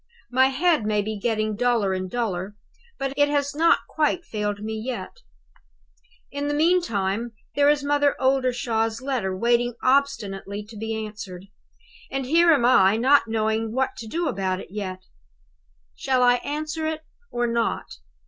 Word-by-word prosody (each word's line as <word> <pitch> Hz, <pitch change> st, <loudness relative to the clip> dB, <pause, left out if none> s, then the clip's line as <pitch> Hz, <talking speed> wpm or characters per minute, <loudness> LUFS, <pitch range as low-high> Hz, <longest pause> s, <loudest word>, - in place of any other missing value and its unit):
My 260 Hz, +1 st, +5 dB
head 305 Hz, 0 st, +2 dB
may 210 Hz, -1 st, +1 dB
be 215 Hz, +1 st, -3 dB
getting 215 Hz, -1 st, -1 dB
duller 230 Hz, -4 st, +1 dB
and 185 Hz, 0 st, -3 dB
duller, 205 Hz, -4 st, -3 dB, 0.4 s
but 275 Hz, 0 st, -2 dB
it 290 Hz, 0 st, +3 dB
has 285 Hz, -1 st, 0 dB
not 330 Hz, +3 st, +4 dB
quite 320 Hz, +3 st, 0 dB
failed 210 Hz, -1 st, -3 dB
me 220 Hz, +1 st, -3 dB
yet. 220 Hz, -3 st, -5 dB, 1.1 s
"In 285 Hz, +1 st, -3 dB
the 290 Hz, -, 0 dB
meantime, 235 Hz, -, +1 dB, 0.2 s
there 285 Hz, 0 st, +4 dB
is 295 Hz, -1 st, +2 dB
Mother 290 Hz, 0 st, +2 dB
Oldershaw's 245 Hz, -4 st, +1 dB
letter 230 Hz, -9 st, -2 dB
waiting 240 Hz, +2 st, +1 dB
obstinately 215 Hz, -7 st, 0 dB
to 225 Hz, -, -11 dB
be 220 Hz, +1 st, -3 dB
answered; 195 Hz, -4 st, -9 dB, 0.6 s
and 270 Hz, -1 st, -3 dB
here 335 Hz, +5 st, +5 dB
am 280 Hz, -7 st, +3 dB
I, 210 Hz, -4 st, +5 dB
not 265 Hz, +2 st, +4 dB
knowing 220 Hz, 0 st, -1 dB
what 260 Hz, +1 st, +1 dB
to 225 Hz, -, -7 dB
do 335 Hz, +9 st, -2 dB
about 185 Hz, -4 st, -1 dB
it -, -, -10 dB
yet. 185 Hz, -3 st, -5 dB, 0.9 s
Shall 260 Hz, -2 st, +1 dB
I 245 Hz, 0 st, +5 dB
answer 310 Hz, +3 st, -3 dB
it 315 Hz, 0 st, -3 dB, 0.3 s
or 240 Hz, 0 st, -1 dB
not? 235 Hz, -1 st, -2 dB
240 Hz, 155 wpm, -24 LUFS, 210-285 Hz, 1.1 s, My